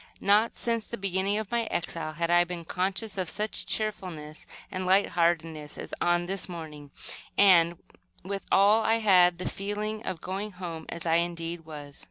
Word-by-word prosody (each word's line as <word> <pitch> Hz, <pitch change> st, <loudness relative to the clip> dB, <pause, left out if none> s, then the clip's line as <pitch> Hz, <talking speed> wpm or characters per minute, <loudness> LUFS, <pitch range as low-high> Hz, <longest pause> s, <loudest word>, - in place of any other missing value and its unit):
Not 210 Hz, +3 st, +3 dB
since 230 Hz, -2 st, 0 dB
the 235 Hz, -, -5 dB
beginning 195 Hz, +1 st, 0 dB
of 215 Hz, -2 st, -4 dB
my 235 Hz, -1 st, +1 dB
exile 165 Hz, -5 st, -3 dB
had 170 Hz, +2 st, -1 dB
I 175 Hz, 0 st, +6 dB
been 175 Hz, -1 st, -6 dB
conscious 195 Hz, +4 st, -2 dB
of 180 Hz, -3 st, -1 dB
such 210 Hz, +1 st, -2 dB
cheerfulness 180 Hz, -8 st, -4 dB, 0.2 s
and 185 Hz, -1 st, -3 dB
light 190 Hz, +2 st, +4 dB
heartedness 165 Hz, -3 st, 0 dB
as -, -, -8 dB
on 175 Hz, 0 st, +2 dB
this 190 Hz, +1 st, -1 dB
morning 155 Hz, -4 st, -8 dB, 0.5 s
and, 175 Hz, -4 st, +6 dB, 0.5 s
with 195 Hz, +2 st, -5 dB
all, 205 Hz, +3 st, +6 dB
I 225 Hz, +1 st, +3 dB
had 180 Hz, -6 st, +5 dB
the 180 Hz, -, -4 dB
feeling 210 Hz, +2 st, -3 dB
of 185 Hz, -6 st, -4 dB
going 195 Hz, +4 st, -4 dB
home, 170 Hz, -3 st, -7 dB
as, 170 Hz, 0 st, -5 dB
indeed, 170 Hz, 0 st, 0 dB
I 160 Hz, -, -22 dB
was. 145 Hz, -2 st, -9 dB
180 Hz, 175 wpm, -28 LUFS, 170-205 Hz, 0.5 s, I